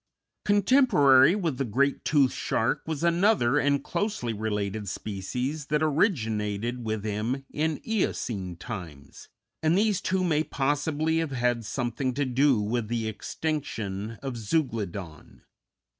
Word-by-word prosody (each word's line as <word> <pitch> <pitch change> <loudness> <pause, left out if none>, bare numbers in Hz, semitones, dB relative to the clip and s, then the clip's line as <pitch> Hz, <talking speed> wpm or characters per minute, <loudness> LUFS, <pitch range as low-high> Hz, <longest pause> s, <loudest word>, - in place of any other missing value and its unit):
Contemporary 195 - +5
with 165 -10 -2
the - - +2
great 135 +4 0
toothed 140 -4 +3
shark 115 +6 0
was 160 -1 -3
another 170 - +3
and 140 0 +1
closely 205 - -2
related 105 -1 -2
species 125 +10 -4
that 150 +1 +1
originated 120 - 0
with 110 -2 -2
him 110 +6 -2
in 155 0 -1
Eocene 110 - -1
times, 85 - -9 0.3
and 160 +3 +3
these 210 -2 +2
two 185 0 0
may 155 -3 +2
possibly 150 +3 0
have 165 -2 -1
had 120 -2 0
something 125 +2 -2
to 145 0 0
do 130 -1 +3
with 110 +2 -1
the 115 -1 -2
extinction 110 -4 -3
of 135 -3 -4
Zeuglodon. 105 - -3
130 Hz, 130 wpm, -27 LUFS, 110-155 Hz, 0.3 s, Contemporary